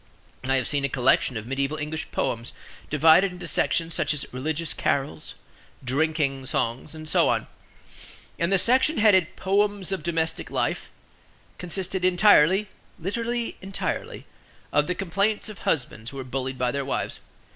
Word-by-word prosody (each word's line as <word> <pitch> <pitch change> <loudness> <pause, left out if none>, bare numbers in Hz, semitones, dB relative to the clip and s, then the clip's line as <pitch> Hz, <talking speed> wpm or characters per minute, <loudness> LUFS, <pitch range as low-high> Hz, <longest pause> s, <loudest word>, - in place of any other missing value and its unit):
I 135 +1 +1
have 130 -2 0
seen 145 -1 0
a 140 - +1
collection 130 -1 +2
of 110 - -6
mediaeval 135 +4 -2
English 155 +1 -4
poems, 115 0 -2 0.4
divided 160 +6 +5
into 180 0 -8
sections 165 -1 0
such 155 - +1
as 140 - -1
"Religious 155 +5 -1
Carols," 135 - -2 0.5
"Drinking 140 0 0
Songs," 120 +7 -2
and 155 0 -9
so 150 - +4
on; - - 0 0.9
and 170 +3 +1
the 195 - +5
section 260 - +3
headed, 190 -6 +4
"Poems 200 0 +1
of 190 - -2
Domestic 160 0 -2
Life" - - -2 0.7
consisted 185 +1 -2
entirely 185 +1 +5 0.3
(literally, 230 +6 -2
entirely) 195 +1 -4 0.5
of 150 - +3
the 180 - -1
complaints 200 +4 -1
of 210 - -9
husbands 120 -6 -2
who 135 - -9
were 135 - -4
bullied 130 +1 -4
by 125 -1 0
their 140 +1 -2
wives. 135 - -3
160 Hz, 150 wpm, -25 LUFS, 135-190 Hz, 0.9 s, divided